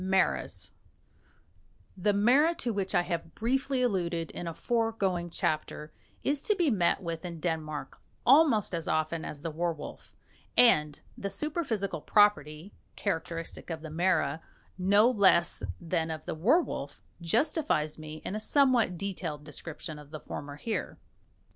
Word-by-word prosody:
MARAS 190 Hz, 0 st, 0 dB, 1.2 s
The 195 Hz, +2 st, +1 dB
mara, 255 Hz, +11 st, +4 dB
to 240 Hz, -6 st, -2 dB
which 195 Hz, -2 st, -2 dB
I 175 Hz, -, +4 dB
have 170 Hz, -2 st, -4 dB
briefly 260 Hz, +3 st, 0 dB
alluded 175 Hz, -7 st, -1 dB
in 175 Hz, -, -6 dB
a 165 Hz, -, -3 dB
foregoing 220 Hz, -7 st, 0 dB
chapter, 155 Hz, -1 st, -2 dB, 0.3 s
is 285 Hz, 0 st, +1 dB
to 420 Hz, -, +1 dB
be 345 Hz, -7 st, +2 dB
met 185 Hz, -2 st, +2 dB
with 165 Hz, -1 st, -4 dB
in 170 Hz, -2 st, -6 dB
Denmark 155 Hz, -3 st, -4 dB, 0.3 s
almost 270 Hz, -, +5 dB
as 165 Hz, -1 st, -3 dB
often 155 Hz, +1 st, 0 dB
as 145 Hz, 0 st, -7 dB
the 165 Hz, -, -3 dB
werwolf; 165 Hz, -1 st, -5 dB, 0.4 s
and 150 Hz, -12 st, +5 dB, 0.2 s
the 200 Hz, -, -4 dB
superphysical 245 Hz, -, -2 dB
property, 195 Hz, -5 st, +2 dB, 0.2 s
characteristic 165 Hz, -4 st, -4 dB
of 160 Hz, -2 st, -4 dB
the 160 Hz, -, -7 dB
mara 165 Hz, -3 st, +1 dB, 0.3 s
no 200 Hz, +4 st, +4 dB
less 195 Hz, -7 st, +4 dB, 0.2 s
than 165 Hz, -1 st, -1 dB
of 155 Hz, -1 st, -5 dB
the -, -, -3 dB
werwolf, 180 Hz, -, 0 dB, 0.2 s
justifies 170 Hz, -, 0 dB
me 155 Hz, 0 st, -8 dB
in -, -, -3 dB
a -, -, -2 dB
somewhat 245 Hz, -6 st, +3 dB
detailed 170 Hz, -6 st, -4 dB
description 155 Hz, +1 st, -7 dB
of 145 Hz, -1 st, -13 dB
the 155 Hz, 0 st, -7 dB
former 145 Hz, 0 st, -7 dB
here. 220 Hz, +9 st, -4 dB
180 Hz, 140 wpm, -29 LUFS, 160-225 Hz, 1.2 s, almost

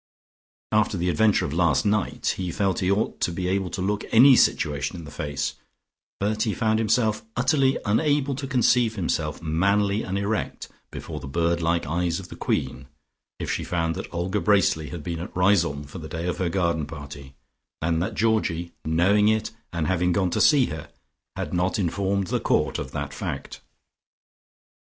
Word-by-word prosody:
After 105 Hz, -2 st, +2 dB
the 90 Hz, +1 st, 0 dB
adventure 105 Hz, +5 st, +3 dB
of 70 Hz, -, -4 dB
last 85 Hz, +2 st, +2 dB
night, 105 Hz, -2 st, 0 dB
he 90 Hz, -2 st, -3 dB
felt 95 Hz, -1 st, 0 dB
he 95 Hz, -, 0 dB
ought 100 Hz, +2 st, 0 dB
to -, -, +1 dB
be 90 Hz, +1 st, -3 dB
able 95 Hz, 0 st, 0 dB
to 90 Hz, -, -4 dB
look 105 Hz, +2 st, -1 dB
any 130 Hz, +4 st, +8 dB
situation 75 Hz, -, +1 dB
in 85 Hz, -2 st, -8 dB
the 75 Hz, -, -10 dB
face, 70 Hz, -1 st, -3 dB, 0.7 s
but 105 Hz, +2 st, 0 dB
he 110 Hz, -2 st, 0 dB
found 110 Hz, -1 st, +1 dB
himself 110 Hz, 0 st, +1 dB
utterly 135 Hz, +1 st, +2 dB
unable 145 Hz, +5 st, +2 dB
to 135 Hz, +1 st, -5 dB
conceive 120 Hz, -3 st, +3 dB
himself 80 Hz, -4 st, -2 dB
manly 100 Hz, +6 st, +1 dB
and 95 Hz, +1 st, -3 dB
erect 105 Hz, +2 st, -2 dB, 0.2 s
before -, -, -7 dB
the -, -, -8 dB
bird 85 Hz, +4 st, 0 dB
like 85 Hz, +1 st, +1 dB
eyes 85 Hz, +3 st, -1 dB
of 95 Hz, -, -10 dB
the -, -, -9 dB
Queen, 65 Hz, +1 st, -2 dB, 0.5 s
if -, -, -3 dB
she -, -, -2 dB
found 80 Hz, -2 st, -1 dB
out -, -, -5 dB
that -, -, -15 dB
Olga 90 Hz, +4 st, -1 dB
Bracely 95 Hz, -7 st, +2 dB
had 85 Hz, -4 st, -7 dB
been 85 Hz, 0 st, -4 dB
at 85 Hz, -, -7 dB
Riseholme 90 Hz, -6 st, +2 dB
for 75 Hz, +5 st, -9 dB
the 80 Hz, -1 st, -8 dB
day 80 Hz, +1 st, -4 dB
of 90 Hz, -, -2 dB
her 90 Hz, -2 st, 0 dB
garden 85 Hz, -4 st, 0 dB
party, 70 Hz, -3 st, -10 dB, 0.4 s
and 80 Hz, 0 st, 0 dB
that 100 Hz, +6 st, -2 dB
Georgie, 95 Hz, -7 st, 0 dB
knowing 95 Hz, +7 st, +3 dB
it 110 Hz, 0 st, +1 dB, 0.2 s
and 85 Hz, -3 st, -2 dB
having 90 Hz, +1 st, +1 dB
gone 90 Hz, 0 st, +1 dB
to -, -, 0 dB
see 140 Hz, -4 st, +6 dB
her, 80 Hz, -6 st, -7 dB, 0.5 s
had -, -, -4 dB
not 90 Hz, +1 st, +1 dB
informed 100 Hz, +1 st, 0 dB
the -, -, 0 dB
Court -, -, +1 dB
of -, -, -5 dB
that -, -, -5 dB
fact. -, -, -5 dB
90 Hz, 185 wpm, -25 LUFS, 80-105 Hz, 0.7 s, any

